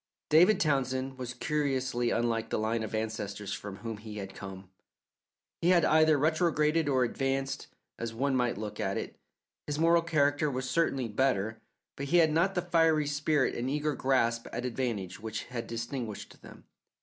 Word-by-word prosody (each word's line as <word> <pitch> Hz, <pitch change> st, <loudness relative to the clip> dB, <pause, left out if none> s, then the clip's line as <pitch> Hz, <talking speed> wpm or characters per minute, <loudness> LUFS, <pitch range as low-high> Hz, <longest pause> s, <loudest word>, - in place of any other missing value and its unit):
David 180 Hz, +6 st, +6 dB
Townsend 130 Hz, -3 st, 0 dB
was 125 Hz, -1 st, -5 dB
curiously 130 Hz, -4 st, 0 dB
unlike 115 Hz, -1 st, 0 dB
the -, -, 0 dB
line 110 Hz, +1 st, 0 dB
of 110 Hz, 0 st, -4 dB
ancestors 105 Hz, -2 st, -3 dB
from 100 Hz, -2 st, -6 dB
whom 115 Hz, +1 st, -6 dB
he 105 Hz, 0 st, -9 dB
had 95 Hz, -1 st, -6 dB
come. 95 Hz, -1 st, -9 dB, 0.9 s
He 170 Hz, -, +3 dB
had 180 Hz, -2 st, +5 dB
either 155 Hz, -1 st, +5 dB
retrograded 155 Hz, 0 st, +2 dB
or 130 Hz, -2 st, +3 dB
advanced, 135 Hz, +2 st, -2 dB, 0.3 s
as 115 Hz, -1 st, -3 dB
one 135 Hz, +4 st, 0 dB
might 125 Hz, -5 st, +1 dB
look 105 Hz, 0 st, -6 dB
at -, -, -1 dB
it. -, -, -6 dB, 0.5 s
His 145 Hz, -1 st, -2 dB
moral 165 Hz, +1 st, +4 dB
character 150 Hz, -2 st, +2 dB
was 130 Hz, -1 st, -3 dB
certainly 135 Hz, -5 st, +1 dB
better, 110 Hz, -2 st, 0 dB, 0.3 s
but 140 Hz, -, -5 dB
he 175 Hz, -, +3 dB
had 160 Hz, -2 st, +5 dB
not 175 Hz, +5 st, +2 dB
the 180 Hz, -, 0 dB
fiery 165 Hz, -3 st, +3 dB
spirit 145 Hz, 0 st, +1 dB
and 125 Hz, +2 st, -2 dB
eager 150 Hz, +1 st, 0 dB
grasp 120 Hz, -4 st, +1 dB
at 120 Hz, +2 st, -4 dB
advantage 115 Hz, -7 st, -3 dB
which 110 Hz, 0 st, -4 dB
had 120 Hz, -2 st, -6 dB
distinguished 115 Hz, -1 st, -5 dB
them. -, -, -13 dB
130 Hz, 170 wpm, -30 LUFS, 115-150 Hz, 0.9 s, David